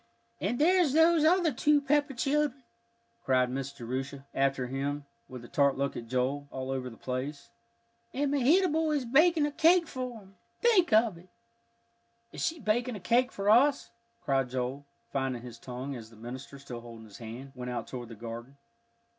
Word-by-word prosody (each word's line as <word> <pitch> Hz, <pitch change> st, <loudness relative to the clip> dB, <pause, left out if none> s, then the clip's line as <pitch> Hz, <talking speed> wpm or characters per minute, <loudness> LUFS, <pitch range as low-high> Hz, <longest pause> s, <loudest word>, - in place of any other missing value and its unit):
"And 245 Hz, -, -1 dB
there's 340 Hz, -1 st, +4 dB
those 325 Hz, 0 st, +5 dB
other 335 Hz, -1 st, +4 dB
two 300 Hz, 0 st, +3 dB
Pepper 285 Hz, 0 st, +1 dB
children," 280 Hz, +1 st, 0 dB, 0.6 s
cried 130 Hz, -1 st, +2 dB
Miss 135 Hz, +1 st, -3 dB
Jerusha 135 Hz, +2 st, -5 dB
after 135 Hz, -1 st, +1 dB
him, 140 Hz, +3 st, -3 dB, 0.2 s
with 125 Hz, -2 st, -9 dB
a -, -, -10 dB
tart 140 Hz, 0 st, +2 dB
look 140 Hz, 0 st, -1 dB
at 115 Hz, -, -6 dB
Joel, 130 Hz, +4 st, -1 dB
"all 130 Hz, -1 st, -5 dB
over 130 Hz, -1 st, -3 dB
the 115 Hz, -, -13 dB
place. 140 Hz, -, -5 dB, 0.6 s
And 280 Hz, +1 st, -1 dB
Mehitable 315 Hz, +3 st, +3 dB
is 280 Hz, -4 st, 0 dB
baking 310 Hz, +5 st, +4 dB
a 295 Hz, -, -1 dB
cake 335 Hz, +4 st, +4 dB
for 255 Hz, -5 st, -5 dB
'em 190 Hz, -1 st, -20 dB, 0.2 s
think 440 Hz, -7 st, +4 dB
of 215 Hz, -5 st, +4 dB
it!" 180 Hz, +2 st, -19 dB, 1.0 s
"Is -, -, -5 dB
she 325 Hz, 0 st, -1 dB
baking 240 Hz, +1 st, 0 dB
a -, -, -6 dB
cake 240 Hz, +7 st, +2 dB
for 200 Hz, 0 st, -4 dB
us?" 265 Hz, +6 st, +4 dB, 0.3 s
cried 135 Hz, -2 st, +1 dB
Joel, 130 Hz, +3 st, -3 dB, 0.2 s
finding 130 Hz, -3 st, -2 dB
his 120 Hz, -2 st, -10 dB
tongue, 130 Hz, +3 st, -6 dB
as 115 Hz, -3 st, -9 dB
the 115 Hz, -, -17 dB
minister, 125 Hz, +5 st, -8 dB
still 125 Hz, -4 st, -8 dB
holding 115 Hz, -1 st, -11 dB
his 105 Hz, -2 st, -13 dB
hand, 120 Hz, +4 st, -8 dB
went 125 Hz, -1 st, -6 dB
out 125 Hz, -, -3 dB
toward 120 Hz, -2 st, -7 dB
the 115 Hz, -, -9 dB
garden. 120 Hz, +4 st, -8 dB
140 Hz, 180 wpm, -30 LUFS, -, 1.0 s, those